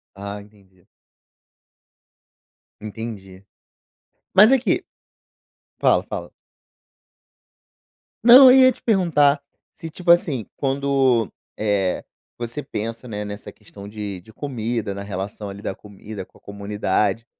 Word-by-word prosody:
Ah, 100 +1 -7
entendi. 100 -3 -23 2.0
Entendi 100 -3 -8 0.9
mas 210 +5 +8
aqui 265 -2 +1 1.0
fala, - - +3
fala. - - -6 2.0
Não 255 +2 +10
eu - - +6
ia 260 0 +7
te 250 - -10
perguntar 155 -9 +2 0.3
se, 165 - -8
tipo 175 +3 -11
assim, 145 - +1
quando, 135 -4 +1 0.3
eh, 100 -3 0 0.3
você 120 +4 -5
pensa 115 +2 -6
né 105 -2 -5
nessa 100 0 -8
questão 100 -1 -13
de 105 -3 -6
de 110 +5 -18
comida, 115 -6 -3
na 100 - -6
relação 100 +1 -6
ali 100 +1 -9
da 100 - -4
comida 105 0 -10
com - - -24
a - - -30
comunidade, 100 +1 -2
110 Hz, 115 wpm, -22 LUFS, 100-140 Hz, 2.0 s, Não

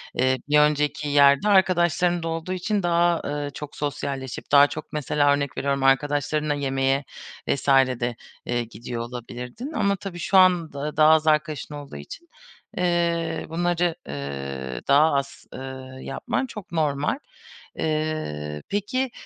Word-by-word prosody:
eee, 130 +1 +2
bir 150 0 +5
önceki 150 0 +2
yerde, 140 +6 +5
arkadaşların 175 -3 +3
da - - -2
olduğu 165 +2 -3
için 195 +2 -1
daha, 170 0 +2
ııı, 145 -1 -3
çok 150 +1 -8
sosyalleşip 135 -3 -4
daha 145 0 +8
çok 155 +1 -8
mesela, 145 -1 +2
örnek 140 -2 -2
veriyorum, 140 -1 0
arkadaşlarınla 145 +2 +2
yemeğe 135 -1 0 0.4
vs. 140 - -1
de, 130 -3 +3 0.3
eee, 120 0 -1
gidiyor 115 +1 -6
olabilirdin 125 - -7
ama 200 -5 +1
tabii 185 -2 -7
şu 190 - +2
anda 160 -5 +3
daha 155 0 +7
az 160 0 +2
arkadaşın 155 -1 +1
olduğu 145 - -9
için, 335 - -10 0.5
eee, 170 -2 0
bunları, 175 0 0
eee, 70 -3 -5
daha 150 +3 +5
az, 140 0 -3
eee, - - -7 0.4
yapman 135 - -2
çok 210 -8 -10
normal. 150 - 0 0.6
Eee, 155 - -2
peki, 250 +6 -1
150 Hz, 135 wpm, -24 LUFS, 135-170 Hz, 0.6 s, daha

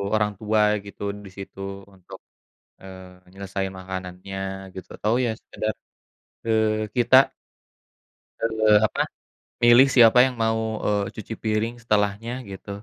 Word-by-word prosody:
orang 105 -1 +1
tua 110 0 +1 0.2
gitu 100 - -12 0.2
disitu 95 0 -11 0.4
untuk, 90 -1 -13 0.6
eee, 95 -1 -13
nyelesaiin 95 0 -4
makanannya 95 0 -7 0.4
gitu 95 -1 -9
atau 110 +2 0
ya - - 0
sekedar, 110 0 -4 0.7
eee, 110 -1 +1
kita 120 +1 +4 1.2
eee, 110 -2 +3
apa, - - -2 0.6
milih 120 +3 +8
siapa 120 0 +7
yang 130 -1 -3
mau, 110 0 +1 0.3
eee, 100 -1 +1
cuci 110 +1 -7
piring 110 +2 -1
setelahnya 105 +1 0 0.2
gitu, 95 +1 -10
105 Hz, 115 wpm, -24 LUFS, 95-110 Hz, 1.2 s, milih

